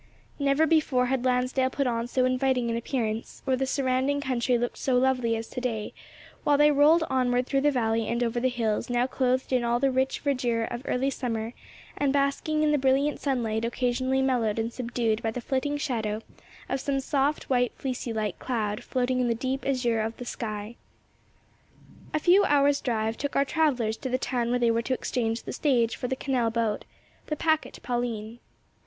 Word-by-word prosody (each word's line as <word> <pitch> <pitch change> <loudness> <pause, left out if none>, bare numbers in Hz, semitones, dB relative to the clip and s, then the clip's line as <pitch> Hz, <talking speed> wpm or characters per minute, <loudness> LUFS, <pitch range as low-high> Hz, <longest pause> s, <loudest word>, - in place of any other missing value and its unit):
Never 280 +2 +3
before 300 -6 +2
had 255 0 -1
Lansdale 255 +1 +1
put 275 +1 -1
on 235 -1 -1
so 255 +1 +1
inviting 255 -2 +1
an - - -1
appearance, 230 -2 -3
or 265 -1 +2
the 265 +1 -1
surrounding 265 +1 +1
country 255 -2 +1
looked 240 +1 -3
so 260 - +1
lovely 250 -3 +2
as 225 0 -4
to 250 - -5
day, 225 -4 -3 0.5
while 290 -1 +3
they 295 +1 +6
rolled 300 +4 +5
onward 250 -1 +1
through 275 +1 +1
the 295 - +4
valley 225 -4 0
and 235 +1 0
over 235 0 0
the 255 +2 +2
hills 230 -2 -1
now 245 0 +2
clothed 260 0 0
in 250 -1 +2
all 235 0 +1
the 275 0 +2
rich 260 +1 0
verdure 250 -5 0
of 240 0 -4
early 265 +2 0
summer 230 -3 -3 0.4
and 285 -1 +1
basking 285 +2 +1
in 305 - +3
the 295 - +2
brilliant 270 +3 +2
sunlight 230 -5 -1
occasionally 255 +2 0
mellowed 235 -5 +1
and 225 +1 -2
subdued 235 -3 -1
by 225 - -1
the 225 - -4
flitting 270 +4 -1
shadow 225 -6 -2 0.4
of 270 - -1
some 275 +1 -1
soft, 280 +2 0
white, 245 -2 +2
fleecy 255 -2 -4
like 215 -4 -2
cloud 215 -5 -2
floating 255 0 0
in 250 - +2
the 230 - +1
deep 260 +3 -2
azure 240 -4 +1
of 225 +1 -3
the 245 - -7
sky. 215 -1 -5 1.3
A - - +1
few 370 +5 +5
hours' 285 0 +3
drive 225 -2 -1
took 285 -1 -3
our 275 - +3
travellers 255 -9 +1
to 260 - -5
the 255 - +1
town 245 -3 -1
where 245 - +2
they 240 -1 +3
were 230 0 +1
to 255 +2 -1
exchange 230 -3 -2
the - - -6
stage 240 -6 +1
for 250 - -4
the 260 - -1
canal 255 -4 0
boat, 225 -2 -1 0.4
the 305 - -1
packet 315 +1 0
Pauline. 240 -2 -3
250 Hz, 195 wpm, -27 LUFS, 235-270 Hz, 1.3 s, they